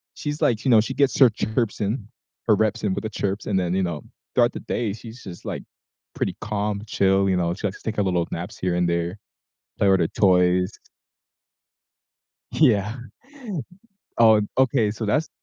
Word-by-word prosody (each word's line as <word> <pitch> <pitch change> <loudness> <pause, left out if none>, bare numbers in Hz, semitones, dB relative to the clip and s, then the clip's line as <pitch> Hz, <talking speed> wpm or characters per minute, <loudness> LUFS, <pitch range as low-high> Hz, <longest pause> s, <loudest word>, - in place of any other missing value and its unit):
she's 150 +1 -4
like 120 -5 +1
you 130 - +3
know, 110 -2 +7
she 130 +4 -4
gets 135 0 +2
her 130 -3 +8
chirps 110 +1 -2
in, 105 +1 -2 0.4
her 105 - +6
reps 110 0 0
in 100 -2 +1
with - - -4
the 110 - -3
chirps, 100 -1 -3
and 95 -3 +1
then, 90 -1 -1
you 95 0 +1
know, 85 -4 -3 0.3
throughout - - +4
the - - -5
day, 110 -5 -2
she's 115 +2 -11
just, 90 -3 -10
like, - - -4 0.5
pretty - - -2
calm, 105 -1 -2
chill, 95 0 +2
you 95 - +2
know, 85 -1 0
she 105 +2 -2
likes 95 - -8
to - - -3
take 110 - -14
a - - +3
little 90 -3 0
naps 90 +6 -5
here 90 -3 -1
and 90 0 +1
there. 85 +3 -1 0.6
Play 100 - +3
with 95 -2 +4
her 80 - +2
toys. 90 -1 +3 1.8
Yeah. 110 -6 +3 1.2
Oh, 110 -2 +7
an 105 -1 0
okay, 120 -5 +3
so 110 0 -4
that's 150 +9 +1
105 Hz, 195 wpm, -23 LUFS, 95-110 Hz, 1.8 s, her